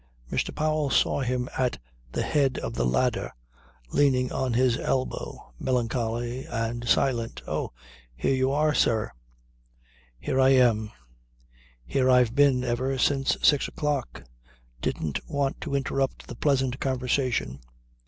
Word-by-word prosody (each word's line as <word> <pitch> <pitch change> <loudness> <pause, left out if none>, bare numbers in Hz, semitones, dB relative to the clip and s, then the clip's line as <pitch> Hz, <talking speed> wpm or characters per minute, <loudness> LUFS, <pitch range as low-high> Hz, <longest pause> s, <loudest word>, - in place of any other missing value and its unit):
Mr. - - -1
Powell 155 -1 0
saw - - +2
him 125 -1 -1
at 125 -2 +1 0.3
the - - -1
head 135 -4 +1
of - - -4
the - - 0
ladder 120 - 0 0.6
leaning 130 -3 +3
on 130 -2 -1
his 125 0 +3
elbow, 130 - -3
melancholy 120 0 -1
and 115 +1 -3
silent. 120 -4 +1
"Oh! - - -2 0.4
Here 65 - 0
you 130 0 +2
are, 150 +2 +2
sir." 110 - +1 1.1
"Here 130 - -1
I 130 0 +6
am. 115 -5 +3 0.9
Here 130 - +1
I've 125 -3 +4
been 140 -2 +4
ever 130 +2 -1
since 135 +1 +2
six 145 -2 +4
o'clock. 145 -4 -3 0.6
Didn't 75 -3 -2
want 140 -2 -1
to 145 -4 -3
interrupt 135 -1 -1
the 120 - -8
pleasant 130 -1 +1
conversation. 125 - -1
130 Hz, 130 wpm, -26 LUFS, 120-135 Hz, 1.1 s, I